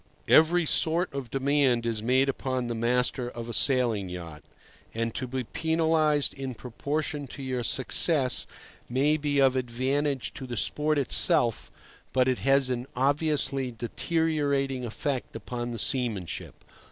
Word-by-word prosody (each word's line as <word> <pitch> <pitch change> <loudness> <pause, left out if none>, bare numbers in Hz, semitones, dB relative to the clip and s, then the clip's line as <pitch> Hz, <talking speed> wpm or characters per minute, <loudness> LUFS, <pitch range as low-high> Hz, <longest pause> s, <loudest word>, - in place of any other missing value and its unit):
Every 165 +2 +5
sort 165 +3 +1
of 135 -4 -5
demand 135 -2 +1
is 115 -2 -2
made 130 +4 +2
upon 130 -2 -2
the 120 - -3
master 120 +2 0
of 120 -1 -8
a 120 - -5
sailing 115 -6 +2
yacht, 85 -4 -8 0.5
and 115 0 -2
to 130 - -4
be 130 +1 -3
penalized 160 0 +1
in 135 -2 -6
proportion 145 +5 -4
to 135 +2 -9
your 130 -2 -2
success 130 +2 +3 0.4
may 140 +5 +2
be 145 -2 -1
of 135 -1 +4
advantage 130 +2 -1
to 130 - -8
the 120 -2 -5
sport 150 +6 +1
itself, 120 -3 +2 0.4
but 130 -1 +3
it 130 -1 0
has 135 -1 +2
an 125 +1 -3
obviously 140 -1 +1
deteriorating 140 +1 -1
effect 125 +3 -4
upon 120 +2 -5
the 120 - -5
seamanship. 115 - -2
130 Hz, 140 wpm, -27 LUFS, 120-145 Hz, 0.5 s, Every